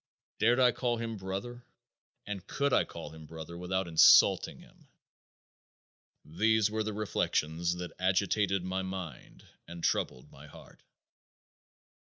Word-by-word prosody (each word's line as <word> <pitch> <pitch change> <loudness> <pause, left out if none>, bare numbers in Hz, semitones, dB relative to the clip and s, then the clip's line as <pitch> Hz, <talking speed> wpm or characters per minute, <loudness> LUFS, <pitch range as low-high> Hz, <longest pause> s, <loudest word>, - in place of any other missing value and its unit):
Dared 120 +4 +3
I 125 -1 +5
call 120 0 -1
him 115 -1 -4
brother? 100 +6 -6 0.6
And 100 -3 -6
could 140 -1 -1
I - - +3
call 85 -3 -9
him 80 -1 -12
brother 80 +1 -9
without 90 +1 -2
insulting 80 -2 +5
him? - - -20 1.4
These 105 +6 +1
were 110 0 -1
the 110 0 -2
reflections 85 -5 -1
that 90 0 -7
agitated 95 +1 +1
my 95 +1 -2
mind 95 -8 -8 0.2
and 85 0 -9
troubled 65 - -1
my 70 +2 -14
heart. - - -16
95 Hz, 130 wpm, -30 LUFS, 85-110 Hz, 1.4 s, I